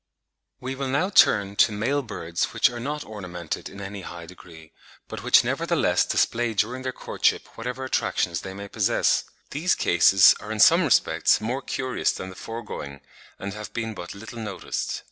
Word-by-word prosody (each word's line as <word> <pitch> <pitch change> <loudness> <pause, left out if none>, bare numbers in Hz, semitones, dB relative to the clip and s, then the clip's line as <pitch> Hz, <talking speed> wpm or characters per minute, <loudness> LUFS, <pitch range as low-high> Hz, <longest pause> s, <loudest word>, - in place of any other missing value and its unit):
We 130 +1 -4
will 135 0 -4
now 145 +9 0
turn 100 - +4
to - - +5
male 115 +8 0
birds 85 -9 -3
which - - +4
are 120 - -6
not 145 +4 -4
ornamented 90 -6 -6
in 100 - -11
any 100 0 -7
high 85 -1 -8
degree, 85 -3 -14 0.4
but - - -7
which - - +6
nevertheless - - +1
display 115 -1 0
during 120 +6 0
their 130 0 -3
courtship - - -1
whatever 125 +3 -5
attractions 85 -9 -1
they 95 0 -8
may 100 0 -7
possess. - - +1 0.3
These 165 +6 +1
cases 95 +2 +6
are 105 - -8
in 110 - -4
some 170 - +7
respects 140 -7 +3
more 120 +5 -3
curious 130 -1 -1
than 95 - -6
the - - -12
foregoing, 75 - -7 0.4
and 100 0 -6
have 105 -1 -8
been 110 -1 -3
but 90 -1 -8
little 110 +3 -9
noticed. 105 -4 -4
110 Hz, 175 wpm, -25 LUFS, 95-130 Hz, 0.4 s, some